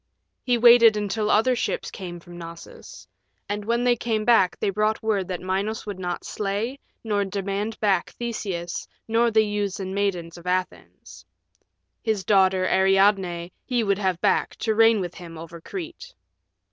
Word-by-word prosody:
He 245 Hz, -2 st, +1 dB
waited 235 Hz, -2 st, +7 dB
until 210 Hz, +1 st, -1 dB
other 250 Hz, +4 st, +3 dB
ships -, -, -2 dB
came 175 Hz, -3 st, -7 dB
from 175 Hz, +1 st, -13 dB
Knossos. 170 Hz, -, -11 dB, 0.4 s
And 205 Hz, 0 st, -3 dB
when 235 Hz, +3 st, 0 dB
they 245 Hz, -1 st, +4 dB
came 220 Hz, -2 st, -2 dB, 0.3 s
they 200 Hz, -, 0 dB
brought 215 Hz, +2 st, 0 dB
word 205 Hz, -4 st, 0 dB
that 180 Hz, -2 st, -4 dB
Minos 195 Hz, +4 st, -2 dB
would 205 Hz, -3 st, -6 dB
not 180 Hz, -1 st, -4 dB
slay 210 Hz, +6 st, -3 dB, 0.2 s
nor 205 Hz, -3 st, 0 dB
demand 200 Hz, +2 st, -3 dB
back 195 Hz, -4 st, +1 dB
Theseus 195 Hz, -7 st, -4 dB, 0.2 s
nor 230 Hz, +1 st, +3 dB
the 220 Hz, -1 st, +3 dB
youths 205 Hz, -2 st, -2 dB
and 190 Hz, -1 st, -4 dB
maidens 180 Hz, -4 st, -2 dB
of 175 Hz, -, -13 dB
Athens. 185 Hz, 0 st, -4 dB, 0.8 s
His 220 Hz, -4 st, -1 dB
daughter, 190 Hz, -1 st, +3 dB
Ariadne, 190 Hz, -3 st, +2 dB
he 245 Hz, -2 st, 0 dB
would 200 Hz, -1 st, +1 dB
have 185 Hz, -4 st, 0 dB
back, -, -, +1 dB
to 220 Hz, -, -1 dB
reign 225 Hz, -1 st, +5 dB
with 175 Hz, -1 st, -4 dB
him 170 Hz, -3 st, -10 dB
over 165 Hz, +1 st, -10 dB
Crete. 375 Hz, -, -8 dB
200 Hz, 160 wpm, -24 LUFS, 185-220 Hz, 0.8 s, waited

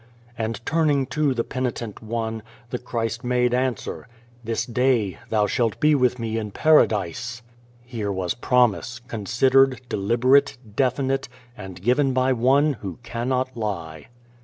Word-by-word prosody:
And, 110 Hz, -2 st, -3 dB
turning 150 Hz, -4 st, +2 dB
to 150 Hz, -3 st, +1 dB
the 115 Hz, -, 0 dB
penitent 120 Hz, -5 st, -4 dB
one, 110 Hz, 0 st, -3 dB, 0.3 s
the 125 Hz, -, -2 dB
Christ 115 Hz, -2 st, -3 dB
made 125 Hz, 0 st, +1 dB
answer: 125 Hz, -3 st, -2 dB, 0.2 s
" 120 Hz, 0 st, -30 dB
This 115 Hz, 0 st, -2 dB
day 120 Hz, -5 st, +1 dB
thou 105 Hz, -2 st, +2 dB
shalt 115 Hz, +1 st, 0 dB
be 150 Hz, 0 st, +4 dB
with 125 Hz, -3 st, +2 dB
Me 115 Hz, -1 st, -2 dB
in 105 Hz, -1 st, -4 dB
Paradise!" 120 Hz, -, +2 dB, 0.4 s
Here 115 Hz, -5 st, -3 dB
was 95 Hz, -2 st, -1 dB
promise, 120 Hz, -1 st, +1 dB
considered, 130 Hz, +4 st, +2 dB
deliberate, 125 Hz, +8 st, +3 dB, 0.2 s
definite, 135 Hz, +1 st, 0 dB, 0.3 s
and 95 Hz, -5 st, -10 dB
given 130 Hz, +4 st, +2 dB
by 130 Hz, +1 st, +2 dB
One 135 Hz, +5 st, +3 dB
who 95 Hz, -4 st, -6 dB
cannot 125 Hz, +2 st, -2 dB
lie. 85 Hz, -9 st, -5 dB
120 Hz, 135 wpm, -23 LUFS, 110-130 Hz, 0.4 s, be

